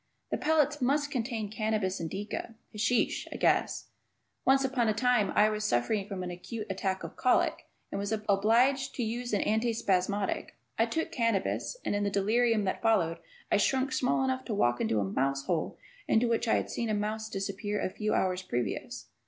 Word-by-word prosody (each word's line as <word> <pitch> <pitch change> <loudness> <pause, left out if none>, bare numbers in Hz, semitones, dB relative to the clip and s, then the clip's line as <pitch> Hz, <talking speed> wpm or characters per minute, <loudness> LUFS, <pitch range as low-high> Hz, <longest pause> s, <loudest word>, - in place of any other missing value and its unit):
The - - +1
pellets 300 -1 +2
must 285 +3 +1
contain 230 -4 -2
cannabis 215 -4 -1
indica 200 +6 -5 0.2
(hashish) 230 +3 +1
I - - -6
guess. - - +1 0.6
Once 270 0 +4
upon 255 -3 +1
a 215 - +2
time 245 -5 +2
I 210 - +6
was 215 0 -2
suffering 200 - +1
from 195 -3 -4
an 180 - -4
acute 210 +5 -6
attack 190 0 -2
of - - -7
colic 255 - +1 0.2
and 195 - -3
was 200 +1 -3
obliged 225 +6 +2
to 245 - -1
use 240 +2 -3
an 205 - +1
anti 225 +2 +1
spasmodic. 200 -1 0 0.2
I 225 - +4
took 320 +8 -2
cannabis, 230 - 0
and - - 0
in 205 - 0
the 200 - +1
delirium 215 +3 +2
that 190 - -2
followed 190 -8 +2 0.3
I - - +5
shrunk 265 0 +1
small 255 +1 +1
enough 260 0 -1
to 220 - -2
walk 120 -10 +2
into 110 -1 +1
a - - +1
mouse 135 +7 -1
hole 170 -4 -1 0.3
into 235 +2 +3
which 230 0 0
I - - +4
had - - -1
seen 235 -1 -2
a 215 - +1
mouse 215 +1 -2
disappear 200 +1 -3
a - - -1
few 215 +2 -1
hours 185 -1 +1
previous. 120 - -3
215 Hz, 190 wpm, -30 LUFS, 195-240 Hz, 0.6 s, I